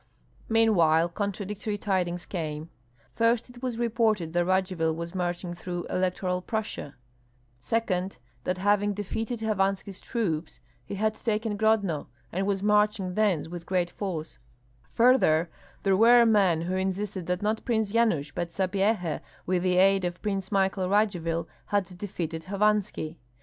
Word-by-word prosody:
Meanwhile 175 -8 +4
contradictory 205 +2 -3
tidings 180 -3 -1
came. 155 -3 -4 0.4
First 230 +1 +1
it 240 -1 -14
was 250 -3 -2
reported 220 -7 +1
that 175 0 +2
Radzivill 185 -3 +1
was 170 +1 -5
marching 175 -1 -2
through 175 0 -5
Electoral 180 0 0
Prussia; 215 -8 -4 0.6
second, 190 - -1 0.3
that 180 - -1
having 205 +1 +2
defeated 225 +3 -3
Hovanski's 195 -2 -1
troops, 170 -10 -2 0.2
he - - -6
had 215 +2 +1
taken 215 -1 -1
Grodno 205 -7 +1 0.2
and 190 +3 -1
was 195 -1 0
marching 210 -2 +2
thence 195 -7 +1
with 170 0 -8
great 180 -2 0
force; 175 -6 -5 0.5
further, 175 -10 +4 0.3
there 195 -1 +3
were 235 +3 +7
men 195 -7 +4
who 175 +2 -2
insisted 190 0 -2
that 180 +2 -1
not 215 +1 0
Prince 220 -4 0
Yanush, 200 -11 +1
but 175 - -3
Sapyeha, 190 -2 0 0.2
with 180 0 +1
the 180 0 +2
aid 195 +1 +5
of 175 0 -2
Prince 195 -3 -2
Michael 190 -1 +1
Radzivill, 175 -5 +1 0.2
had 190 -3 -1
defeated 165 -5 -4
Hovanski. 200 -5 0
190 Hz, 140 wpm, -27 LUFS, 175-210 Hz, 0.6 s, were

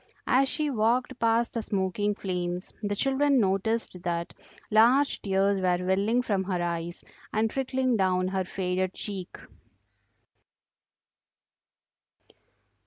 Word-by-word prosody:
As 265 +1 +3
she 300 0 0
walked 240 +2 +1
past 230 +1 +2
the 230 - -1
smoking 205 0 -1
flames 180 -2 -4
the 205 -1 -1
children 275 +3 +2
noticed 195 -1 0
that 170 -1 -3 0.4
large 245 +6 +4
tears 195 0 +1
were 180 -1 +2
welling 200 +6 +2
from 200 -5 0
her 185 -2 -1
eyes 170 0 -3 0.3
and 220 0 +1
trickling 260 -2 0
down 185 -1 +1
her 190 0 -1
faded 185 0 -2
cheek. 190 -3 -6
200 Hz, 110 wpm, -27 LUFS, 185-235 Hz, 0.4 s, large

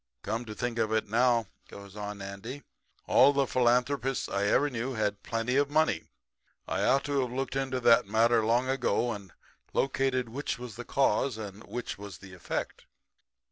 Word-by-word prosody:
Come 115 +3 -2
to 110 -2 -7
think 120 -1 -2
of 110 - +1
it 110 -1 +1
now,' 120 +1 +3 0.2
goes 100 0 -11
on 105 -1 -6
Andy, 110 +8 -7 0.4
'all 140 +2 +6
the 140 -1 +2
philanthropists 125 +2 +1
I 100 +1 -1
ever 135 +8 +3
knew 130 -1 -3
had 105 -2 -1
plenty 115 +3 -1
of 140 0 +2
money. 155 - +2 0.6
I - - -1
ought 135 +1 +3
to 140 -1 0
have 125 -2 -2
looked 135 +1 -3
into 135 -1 -1
that 120 -2 +5
matter 115 +2 +3
long 120 +3 +2
ago, 125 -2 +1
and 100 -4 -7 0.4
located 135 -2 +1
which 140 +6 -3
was 120 -3 -8
the 120 - -7
cause 135 -2 +1
and 105 -1 -8
which 120 -4 -5
was 100 -1 -8
the 95 -1 -13
effect.' 90 - -5
120 Hz, 180 wpm, -29 LUFS, 105-130 Hz, 0.6 s, all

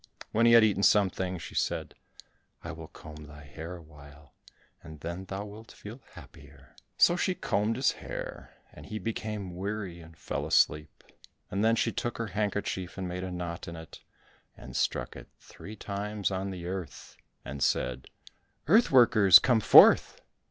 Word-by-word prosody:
When 115 +2 +3
he 115 - +6
had 115 -1 +8
eaten 105 -3 +2
something 95 -3 +2
she 80 - -9
said, - - -2 0.7
"I - - -6
will 80 0 -9
comb 75 -1 -12
thy 75 0 -13
hair 80 +5 -8
a 85 - -12
while, 70 -2 -17 0.5
and 80 -1 -12
then 85 +3 -6
thou 95 +2 -6
wilt 110 +2 -12
feel 115 +6 -11
happier." 70 -1 -16 0.2
So 175 - +5
she 180 +1 -1
combed 105 - -1
his 130 +3 +2
hair, - - -8 0.2
and - - -13
he 110 - -5
became 105 -4 -5
weary 95 -2 -5
and 80 0 -15
fell - - -4
asleep, 75 +1 +1 0.5
and 100 +3 -1
then 115 +1 +4
she - - 0
took 120 - -4
her 115 - -3
handkerchief 100 -3 -3
and 95 -1 -4
made 90 +1 -5
a 95 - -4
knot 90 -1 -6
in 85 - -7
it, 80 -1 -12 0.6
and - - -11
struck - - -1
it - - -11
three 105 - -12
times 100 0 -4
on 95 +1 -3
the 90 -3 -7
earth, 90 -1 -7 0.3
and 70 0 -7
said, 65 0 -1 0.6
"Earth 220 +9 +5
workers, 110 -7 +7
come 120 +3 +2
forth." - - +6
95 Hz, 170 wpm, -28 LUFS, 80-105 Hz, 0.7 s, had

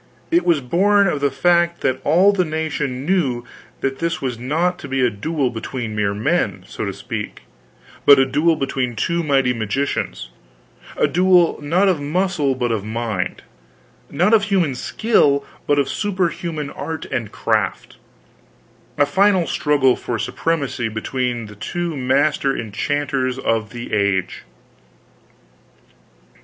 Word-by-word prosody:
It 340 +1 +3
was 165 -5 +3
born 200 +10 +3
of 150 -5 -1
the 140 - +3
fact 170 +4 +2
that 130 0 0
all 180 +7 +4
the 190 -2 +2
nation 150 -5 -3
knew 140 -10 0 0.4
that 135 0 -2
this 170 +1 -1
was 125 -4 -3
not 165 +8 0
to - - -8
be 135 -1 +1
a 120 - +1
duel 135 +5 -1
between 115 -1 -5
mere 100 -1 0
men, 105 - 0
so - - -5
to - - -2
speak, - - -6 0.6
but 140 - +8
a 135 - +4
duel 150 +5 +2
between 130 -4 -2
two 170 +10 0
mighty 135 -5 +2
magicians; 115 - -2 0.7
a - - +3
duel 180 -1 +3
not 175 +7 +2
of 180 -6 +1
muscle 155 -2 0
but 120 -2 -1
of 110 -3 -1
mind, 110 -4 -3 0.7
not 180 +9 +2
of 210 -2 +5
human 185 -8 +1
skill 140 - +2 0.2
but 145 - +3
of 140 -2 +2
superhuman 170 -5 -2
art 160 -1 -5
and 120 -6 -3
craft; - - -1 1.0
a 145 - +4
final 190 +3 +3
struggle 145 -5 +2
for 120 - -4
supremacy 135 +1 -2
between 120 +2 -2
the 105 0 -11
two 170 - -3
master 135 +1 +1
enchanters 130 +3 -2
of 115 -4 -1
the 120 -2 -8
age. 100 -3 0
140 Hz, 145 wpm, -20 LUFS, 125-170 Hz, 1.0 s, but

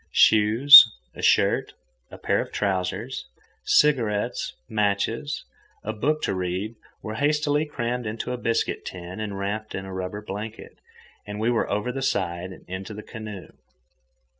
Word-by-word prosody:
Shoes, 115 +7 +9 0.3
a - - -9
shirt, - - +2 0.4
a - - -11
pair - - 0
of - - -7
trousers, 100 +5 -2 0.4
cigarettes, 130 - +1
matches, 105 +6 -1 0.4
and 110 - -3
a - - -12
book 150 +8 0
to - - 0
read 95 +4 -3 0.3
were 110 - -5
hastily 150 +1 +1
crammed 120 -4 -3
into 115 +3 -4
a - - -3
biscuit 115 -1 -1
tin 90 +2 -8
and 105 -2 -4
wrapped 105 +2 -4
in 95 - -5
a 95 - -8
rubber 95 +3 -5
blanket, 105 +2 -8 0.5
and 105 0 -6
we 115 +2 +1
were 115 - 0
over 105 +4 -1
the 135 +1 -5
side 85 -7 -2
and - - -13
into 95 +3 -6
the 105 - -8
canoe. 105 -5 -9
105 Hz, 155 wpm, -24 LUFS, 95-120 Hz, 0.5 s, Shoes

